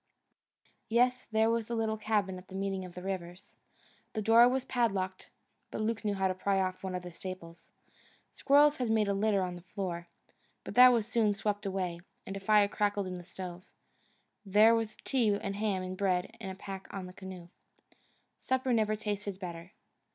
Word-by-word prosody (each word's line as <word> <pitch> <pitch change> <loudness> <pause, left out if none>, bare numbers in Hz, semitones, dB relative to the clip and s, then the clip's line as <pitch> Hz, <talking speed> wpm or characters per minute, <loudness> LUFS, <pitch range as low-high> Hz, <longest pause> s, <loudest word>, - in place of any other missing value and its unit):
Yes, 250 +2 +2
there 220 0 +3
was 230 -1 -1
the 235 - -2
little 220 -1 0
cabin 210 -3 -1
at 180 - -16
the 190 - -10
meeting 195 -1 -2
of 175 -1 -11
the 180 - -7
rivers. 190 0 -6 0.6
The 220 - -2
door 230 +3 +7
was 260 0 -1
padlocked, 195 -7 -1 0.4
but - - -5
Luke 225 +1 -1
knew 205 -1 0
how 190 0 +1
to 185 - 0
pry 195 +1 0
off 185 0 -2
one 185 -1 -3
of 180 - -4
the 180 - -8
staples. 170 -1 -9 0.6
Squirrels 295 +2 +4
had 250 -3 -1
made 220 -2 +2
a 200 - +1
litter 200 -1 +2
on 180 -1 -3
the 175 - -10
floor, 180 -2 -5 0.6
but - - -7
that 250 0 +9
was 230 -3 +2
soon 220 -2 +1
swept 205 0 -2
out, 185 -3 -2 0.3
and 195 - -6
a - - -4
fire 205 +1 +4
crackled 205 -1 0
in 185 - -5
the 180 - -6
stove. 180 0 -8 0.8
There 210 +3 +6
was 225 -2 -1
tea 225 -7 +2
and 195 - -4
ham 205 -3 0
and 185 0 -5
bread 185 -2 0
in 195 - -5
the 190 - -6
pack 195 0 -8
in 195 -2 -5
the 180 - -10
canoe. 185 -2 -9 0.9
Supper 260 -1 0
never 215 -2 +2
tasted 205 -2 -4
better. 170 -1 -7
200 Hz, 195 wpm, -31 LUFS, 185-220 Hz, 0.9 s, that